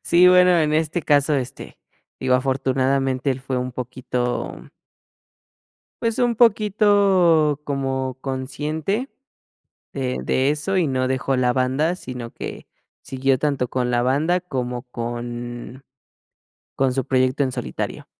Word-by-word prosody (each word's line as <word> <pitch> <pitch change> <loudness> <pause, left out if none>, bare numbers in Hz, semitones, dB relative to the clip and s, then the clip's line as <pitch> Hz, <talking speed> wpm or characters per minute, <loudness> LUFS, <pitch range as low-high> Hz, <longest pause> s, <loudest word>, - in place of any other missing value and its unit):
Sí, 180 +1 +5
bueno, 180 -1 +6
en 155 -1 +1
este 160 +2 0
caso, 145 0 +3
este, 130 -2 -5 0.4
digo, 130 -1 +2
afortunadamente 135 0 +1
él 130 0 -2
fue 135 -1 -3
un 125 0 -3
poquito 125 0 -4 1.3
pues, 230 +1 0
un 240 -1 +2
poquito 200 - +3
como 135 -2 -2
consciente, 150 - -3 0.8
de 130 -2 -2
de 130 +2 +1
eso 155 +6 0
y 170 - +2
no 130 -1 0
dejó 130 0 0
la 125 -1 +2
banda, 135 +7 +1
sino 125 -7 -7
que - - -8 0.4
siguió 135 0 0
tanto 140 -4 0
con 125 -1 -1
la 120 - +2
banda, 150 +8 +1
como 125 -7 -4
con 120 +1 -6 0.9
con 135 -1 +2
su 135 -1 -2
proyecto 130 +2 +2
en 130 - -2
solitario. 125 -2 -5
135 Hz, 130 wpm, -22 LUFS, 130-160 Hz, 1.3 s, bueno